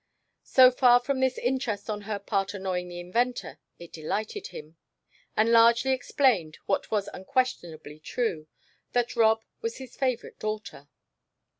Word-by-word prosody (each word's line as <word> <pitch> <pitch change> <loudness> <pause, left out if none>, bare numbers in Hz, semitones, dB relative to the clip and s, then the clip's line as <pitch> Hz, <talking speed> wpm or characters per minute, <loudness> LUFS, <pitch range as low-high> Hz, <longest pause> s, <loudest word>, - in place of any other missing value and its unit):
So 255 -1 +7
far 245 -1 +5
from 260 +2 -2
this 260 -1 +1
interest 245 -5 -2
on 210 -1 -3
her 210 - -1
part 200 0 -2
annoying 185 -2 -3
the 175 0 -7
inventor, 235 +8 -2 0.2
it 170 -1 -13
delighted 215 - -4
him, 155 +2 -11 0.6
and 220 +2 +3
largely 235 +3 +5
explained 245 - +1
what 195 - -1
was 210 -2 0
unquestionably 175 - -3
true 155 -2 -3 0.5
that 245 0 0
Rob 220 -1 +3 0.2
was 230 0 -3
his 260 -2 -10
favorite 255 -3 -2
daughter. 210 -10 -5
220 Hz, 140 wpm, -27 LUFS, 180-250 Hz, 0.6 s, So